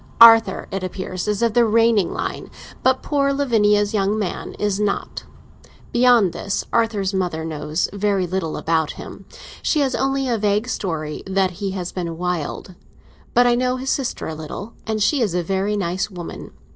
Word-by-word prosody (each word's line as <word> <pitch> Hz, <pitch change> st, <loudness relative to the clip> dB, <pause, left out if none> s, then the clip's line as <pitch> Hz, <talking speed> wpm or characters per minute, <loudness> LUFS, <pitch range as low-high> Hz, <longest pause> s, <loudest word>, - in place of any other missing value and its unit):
Arthur, 225 Hz, -4 st, +7 dB
it 195 Hz, -1 st, -3 dB
appears, 185 Hz, 0 st, -4 dB
is 210 Hz, +1 st, 0 dB
of 230 Hz, -2 st, +2 dB
the 240 Hz, 0 st, +5 dB
reigning 225 Hz, -3 st, +3 dB
line, -, -, -4 dB, 0.3 s
but 260 Hz, 0 st, +2 dB
poor 280 Hz, -1 st, +1 dB
Lavinia's 210 Hz, -7 st, +2 dB
young 205 Hz, 0 st, +1 dB
man 200 Hz, -5 st, -4 dB
is 205 Hz, -1 st, -1 dB
not. 205 Hz, -1 st, -2 dB, 0.7 s
Beyond 240 Hz, -6 st, +4 dB
this, 200 Hz, -, -2 dB
Arthur's 215 Hz, -4 st, +1 dB
mother 175 Hz, -4 st, -1 dB
knows 155 Hz, +1 st, -2 dB
very 200 Hz, -2 st, +1 dB
little 175 Hz, -3 st, -3 dB
about 160 Hz, -2 st, 0 dB
him; -, -, -10 dB, 0.4 s
she 305 Hz, -, +1 dB
has 270 Hz, -2 st, +1 dB
only 270 Hz, 0 st, 0 dB
a 235 Hz, -3 st, 0 dB
vague 210 Hz, +2 st, +1 dB
story 160 Hz, -10 st, -3 dB
that 190 Hz, -1 st, +1 dB
he 200 Hz, -, -1 dB
has 180 Hz, -1 st, -4 dB
been 170 Hz, -3 st, -4 dB
'wild.' 180 Hz, +1 st, -3 dB, 0.6 s
But 245 Hz, +1 st, +6 dB
I 245 Hz, -, +4 dB
know 250 Hz, +1 st, +1 dB
his 265 Hz, +1 st, -2 dB
sister 270 Hz, -3 st, -2 dB
a 160 Hz, -, -4 dB
little, 160 Hz, +8 st, -7 dB
and 215 Hz, -1 st, 0 dB
she 270 Hz, +6 st, +2 dB
is 205 Hz, -7 st, 0 dB
a 175 Hz, -, 0 dB
very 195 Hz, +4 st, -1 dB
nice 190 Hz, +1 st, -1 dB
woman. 175 Hz, -4 st, -8 dB
205 Hz, 175 wpm, -21 LUFS, 180-230 Hz, 0.7 s, Arthur